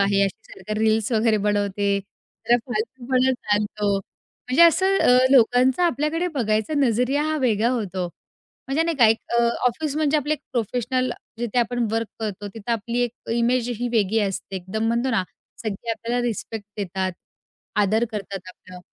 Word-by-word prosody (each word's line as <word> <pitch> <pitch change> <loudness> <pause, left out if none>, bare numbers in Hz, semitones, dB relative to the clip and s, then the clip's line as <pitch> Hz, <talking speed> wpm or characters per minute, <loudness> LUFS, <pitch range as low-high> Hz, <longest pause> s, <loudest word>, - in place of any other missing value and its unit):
आहे 200 0 +3
अशी 195 - -6
सारखी 215 +3 -5
रील्स 220 +1 +2
वगैरे 220 0 +3
बनवते, 200 -1 +1 0.5
तर 240 - +6
फालतूपणा 255 +3 0
चालतो. 210 -3 0
म्हणजे 255 - -2
असं 380 +4 +5
अ, 250 - +5
लोकांचा 255 +4 +4
आपल्याकडे 330 +2 0
बघायचा 220 +2 0
नजरिया 260 +2 +2
हा 310 0 0
वेगळा 230 -2 +2
होतो, 190 -7 -2 0.6
म्हणजे 280 +4 +2
नाही 330 -1 -1
का 240 -4 +6
एक 225 - +3 0.2
अ, - - +4 0.2
ऑफिस 285 +4 -1
म्हणजे 305 -1 +2
आपले 295 0 0
एक 300 - -12
प्रोफेशनल 245 +2 -1 0.3
जिथे 240 0 -1
आपण 240 0 +1
वर्क 225 -1 -1
करतो, 205 -2 -4
तिथं 220 +3 -8
आपली 230 +2 -2
एक 240 -1 -8
इमेज 240 +1 +1
ही 245 0 -1
वेगळी 220 -1 +2
असते. 195 -1 -3
एकदम 190 +5 -3
म्हणतो 235 +3 +1
ना, 220 -6 +2 0.4
सगळे 220 +1 -4
आपल्याला 235 +2 -2
रिस्पेक्ट 220 -1 -4
देतात, 190 -2 -2 0.7
आदर 215 +3 +2
करतात 200 -2 -5
आपलं 185 0 -13
230 Hz, 160 wpm, -23 LUFS, 205-255 Hz, 0.7 s, तर